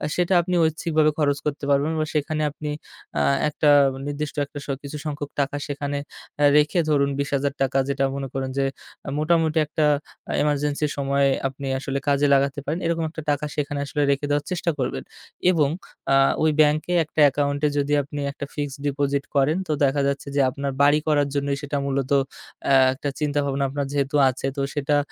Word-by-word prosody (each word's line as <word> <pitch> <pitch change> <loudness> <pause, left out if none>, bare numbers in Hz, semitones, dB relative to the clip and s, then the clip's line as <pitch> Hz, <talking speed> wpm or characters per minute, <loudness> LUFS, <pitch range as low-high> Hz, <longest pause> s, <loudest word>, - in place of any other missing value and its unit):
সেটা 180 +1 +1
আপনি 180 +1 -2
ঐচ্ছিকভাবে 160 -1 +1
খরচ 145 -2 +2
করতে 150 -1 -3
পারবেন 140 +2 +2
বা 155 - +1
সেখানে 155 0 -1
আপনি 150 +1 -5 0.5
আ - - +2 0.3
একটা 150 0 +1 0.4
নির্দিষ্ট 145 0 -4
একটা 145 - -11
স - - -16 0.2
কিছু 140 +1 -6
সংখ্যক 145 -1 -4
টাকা 140 +1 -2
সেখানে 145 0 -3 0.6
রেখে, 150 +4 +2
এ - - -2
ধরুন 140 -2 +3
20,000 140 0 0
টাকা 135 0 +1
যেটা 140 0 0
মনে 140 -1 -3
করুন 135 -1 -2
যে 135 - +2 0.5
মোটামুটি 160 +1 +2
একটা 155 0 0 0.6
ইমারজেন্সির 150 0 0
সময়ে 140 0 +2 0.2
আপনি 135 +1 -7
আসলে 135 0 -3
কাজে 145 0 +3
লাগাতে 140 +1 +2
পারেন, 165 - -2
এরকম 165 0 0
একটা 160 0 -7
টাকা 145 +1 -1
সেখানে 145 -1 -2
আসলে 145 +1 -2
রেখে 140 +1 0
দেওয়ার 145 0 0
চেষ্টা 175 -1 0
করবেন 65 - -2 0.5
এবং 155 -6 +2 0.4
আ - - +6 0.3
ওই 155 - +4
ব্যাংকে 155 +3 +2
একটা 155 - -6
অ্যাকাউন্টে 145 +1 +1
যদি 145 +1 +1
আপনি 145 +1 -7
একটা 140 - -6
ফিক্সড 145 -2 -4
ডিপোজিট 140 0 0
করেন 140 +4 +3
তো - - -2
দেখা 140 +1 +2
যাচ্ছে 140 0 -2
যে - - +2
আপনার 140 +1 -3
বাড়ি 145 +1 +5
করার 145 -2 +3
জন্যই 140 0 0
সেটা 145 0 -3
মূলত 135 -1 -1 0.6
অ্যা 135 -1 +6 0.2
একটা 140 +2 -4
চিন্তাভাবনা 145 -2 0
আপনার 140 +1 -2
যেহেতু 140 0 -1
আছে, 130 +1 -5
তো - - 0
সেটা 145 0 +1
145 Hz, 180 wpm, -23 LUFS, 140-150 Hz, 0.6 s, আ